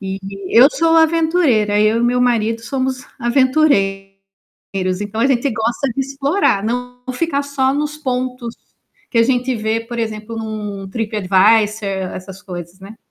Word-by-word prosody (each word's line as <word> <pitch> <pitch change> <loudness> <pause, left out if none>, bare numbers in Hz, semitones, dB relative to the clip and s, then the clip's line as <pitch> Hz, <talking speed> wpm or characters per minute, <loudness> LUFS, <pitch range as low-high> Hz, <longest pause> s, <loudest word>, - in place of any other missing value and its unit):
E 195 -1 -4 0.3
eu 245 +4 +7
sou 330 0 +2
aventureira, 320 -10 +3
eu 215 +2 +3
e 235 - 0
meu 250 +1 +2
marido 230 -2 +1
somos 260 +1 -3
aventureiros, 195 -8 -1
então 210 +2 -4
a - - +4
gente 270 0 +1
gosta 235 +4 -1
de 270 - -2
explorar, 275 - 0
não 250 +2 -3
ficar 285 +1 -1
só 275 -1 0
nos 300 +1 -2
pontos 250 -4 -3 0.6
que 235 - +1
a - - +6
gente 250 +1 +1
vê, 220 +1 -1
por 235 +1 -7
exemplo, 220 0 -4
num 210 -3 -5
Trip 225 0 -4
Advisor, 210 +2 +3 0.3
essas 190 +1 -9
coisas, 175 -2 -8
né. 200 +3 -11
230 Hz, 150 wpm, -18 LUFS, 210-265 Hz, 0.6 s, eu